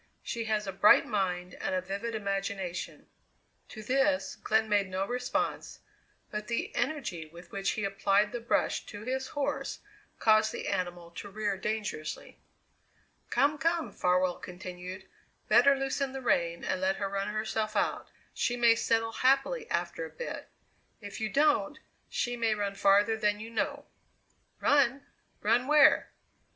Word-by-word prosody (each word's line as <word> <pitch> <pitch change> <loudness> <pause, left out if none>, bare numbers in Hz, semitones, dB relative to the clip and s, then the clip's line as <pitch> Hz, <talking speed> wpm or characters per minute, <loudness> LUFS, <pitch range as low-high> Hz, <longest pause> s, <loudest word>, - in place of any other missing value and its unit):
She 230 -2 -3
has 215 -1 0
a 195 - -3
bright 195 +2 +6
mind 180 -4 -1
and - - -1
a - - +2
vivid 200 +5 -4
imagination." 195 -3 -3 0.6
To 215 - -9
this 270 +4 +1
Glenn 220 0 +1
made 205 -2 +2
no 190 +1 -1
response, 245 +3 -2 0.5
but 210 0 -4
the 235 - -2
energy 235 - -2
with 170 +3 -14
which 195 0 -1
he 215 - -3
applied 200 +1 +2
the 240 - -3
brush 235 - 0
to 205 0 -8
his 260 +2 -2
horse 285 0 -2 0.4
caused 215 0 +4
the - - -5
animal 175 -1 -3
to 200 +4 -8
rear 205 0 -1
dangerously. 190 -6 -4 0.9
"Come, 295 +1 +2
come," 330 +1 0
Farwell 180 0 +1
continued; 180 +1 -8 0.4
"better 280 0 +6
loosen 270 0 -1
the 270 - -5
rein 170 -7 +1
and 185 - -1
let 190 +1 +2
her 200 - -2
run 195 0 -2
herself 215 0 -2
out 200 - 0 0.2
she 245 - 0
may 235 -1 +6
settle 225 0 +1
happily 275 - +1
after - - -2
a - - -6
bit. - - -7 0.5
If 205 -1 -8
you 220 - 0
don't, 295 +3 +2 0.3
she 245 0 -1
may 230 -2 +1
run 205 -1 -2
farther 200 +3 +4
than 210 -1 +1
you 225 +1 -8
know." 285 +5 -2 0.7
"Run? 280 -1 +3 0.4
Run 250 +2 +3
where?" 300 0 +6
215 Hz, 150 wpm, -30 LUFS, 195-250 Hz, 0.9 s, bright